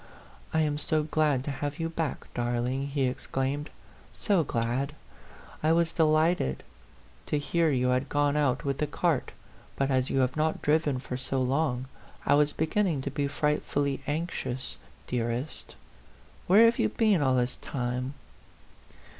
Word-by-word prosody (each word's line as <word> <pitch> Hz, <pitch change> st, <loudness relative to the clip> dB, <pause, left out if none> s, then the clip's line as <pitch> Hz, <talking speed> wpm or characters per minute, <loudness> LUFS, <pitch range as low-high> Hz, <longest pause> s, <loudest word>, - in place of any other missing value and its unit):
" -, -, -24 dB
I 160 Hz, -, +2 dB
am 150 Hz, -1 st, 0 dB
so 155 Hz, 0 st, +2 dB
glad 150 Hz, -3 st, +1 dB
to 145 Hz, -, -3 dB
have 145 Hz, +2 st, -4 dB
you 165 Hz, -, -1 dB
back, 165 Hz, -2 st, -3 dB
darling," 120 Hz, +3 st, -1 dB
he 140 Hz, -1 st, -1 dB
exclaimed 135 Hz, +3 st, -2 dB, 0.3 s
" -, -, -26 dB
so 195 Hz, -6 st, +4 dB
glad! 130 Hz, +3 st, -1 dB, 0.7 s
I 155 Hz, +1 st, +3 dB
was 165 Hz, 0 st, +2 dB
delighted 155 Hz, -, +2 dB, 0.6 s
to -, -, +1 dB
hear 165 Hz, +3 st, +1 dB
you 125 Hz, -3 st, +2 dB
had 130 Hz, +2 st, +1 dB
gone 145 Hz, 0 st, +2 dB
out 145 Hz, -4 st, +1 dB
with 140 Hz, -1 st, -1 dB
the 150 Hz, -, +1 dB
cart, 155 Hz, -1 st, 0 dB, 0.4 s
but 135 Hz, 0 st, 0 dB
as 130 Hz, -1 st, +1 dB
you -, -, 0 dB
have 125 Hz, 0 st, +1 dB
not 155 Hz, +1 st, 0 dB
driven 150 Hz, -2 st, +2 dB
for 125 Hz, 0 st, -5 dB
so 130 Hz, +1 st, -2 dB
long, 130 Hz, 0 st, 0 dB, 0.4 s
I -, -, +4 dB
was 150 Hz, +1 st, +4 dB
beginning 160 Hz, -2 st, 0 dB
to 140 Hz, -, -3 dB
be 140 Hz, 0 st, -1 dB
frightfully 145 Hz, -1 st, 0 dB
anxious, 145 Hz, -5 st, -3 dB, 0.3 s
dearest. 120 Hz, +3 st, -3 dB, 0.7 s
Where 205 Hz, +5 st, +7 dB
have 230 Hz, +1 st, +3 dB
you -, -, +3 dB
been 215 Hz, -7 st, +2 dB
all 130 Hz, -2 st, +3 dB
this 125 Hz, 0 st, 0 dB
time 125 Hz, +1 st, -3 dB
145 Hz, 160 wpm, -28 LUFS, 130-155 Hz, 0.7 s, Where